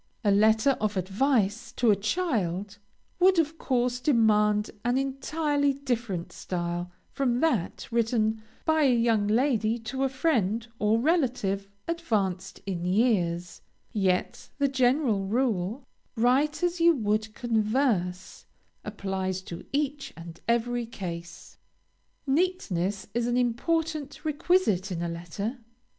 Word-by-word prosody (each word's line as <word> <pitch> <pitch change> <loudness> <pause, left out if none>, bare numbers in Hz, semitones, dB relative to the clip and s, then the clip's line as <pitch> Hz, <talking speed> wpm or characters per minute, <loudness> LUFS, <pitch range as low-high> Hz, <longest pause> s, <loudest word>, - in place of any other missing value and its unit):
A 205 - +3
letter 220 +6 +4
of 210 -2 0
advice 220 +3 +1
to 235 -3 +3
a - - +5
child, 205 - -1 0.4
would 370 0 +5
of 320 0 +1
course 250 -1 0
demand 210 -5 +3
an 245 +2 +1
entirely 285 +2 0
different 235 -10 -3
style, 175 0 -4 0.2
from 250 -3 0
that 245 - 0
written 225 -1 +1 0.2
by 315 -1 +3
a 265 -4 +4
young 230 -3 +2
lady 225 -1 +2
to 240 +4 -5
a 270 - +2
friend 230 - 0
or 215 +2 +3
relative 245 - 0 0.2
advanced 205 - -2
in 180 -3 -3
life; 180 -4 +1 0.3
yet 190 -4 0
the 280 -1 +2
general 255 -6 +2
rule, 225 0 0 0.3
"write 265 +8 +2
as 350 -1 0
you 335 -1 +6
would 215 -2 -1
converse," 220 -6 0 0.4
applies 190 -3 -3
to 170 -2 -8
each 290 0 -2
and 170 0 -10
every 235 0 0
case. 175 -6 -8 0.7
Neatness 225 - 0
is 240 +1 0
an 245 0 +1
important 295 +4 -1
requisite 295 - +1
in 170 -1 -2
a - - -1
letter. 175 +9 -5
230 Hz, 120 wpm, -27 LUFS, 195-275 Hz, 0.7 s, you